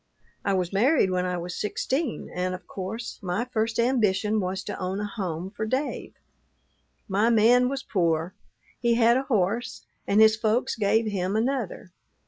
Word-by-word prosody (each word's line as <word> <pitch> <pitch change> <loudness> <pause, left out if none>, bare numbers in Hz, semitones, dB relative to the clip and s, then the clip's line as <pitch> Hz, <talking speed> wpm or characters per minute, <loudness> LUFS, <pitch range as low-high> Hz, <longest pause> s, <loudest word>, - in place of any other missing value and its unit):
"I 200 - +1
was 180 0 -1
married 230 0 +3
when 180 0 0
I 180 0 -2
was 175 +1 -5
sixteen, 260 +6 -2
and 185 0 -1
of 185 - -12
course, 220 +5 -6
my 195 +5 -2
first 225 -2 -1
ambition 215 -4 +2
was 190 0 -2
to - - -6
own 185 +1 -2
a 210 - -2
home 185 -4 -4
for 220 - -5
Dave. 260 +7 -3 0.9
My 210 +3 +2
man 240 +2 +5
was 270 0 -4
poor. 170 -2 0 0.5
He 235 -1 +2
had 235 0 +5
a 260 - +2
horse, 220 +1 -1 0.2
and 200 - +3
his 220 0 +7
folks 220 +2 0
gave 220 +1 +2
him 195 -2 -1
another. 230 -6 -2
210 Hz, 165 wpm, -26 LUFS, 185-235 Hz, 0.9 s, his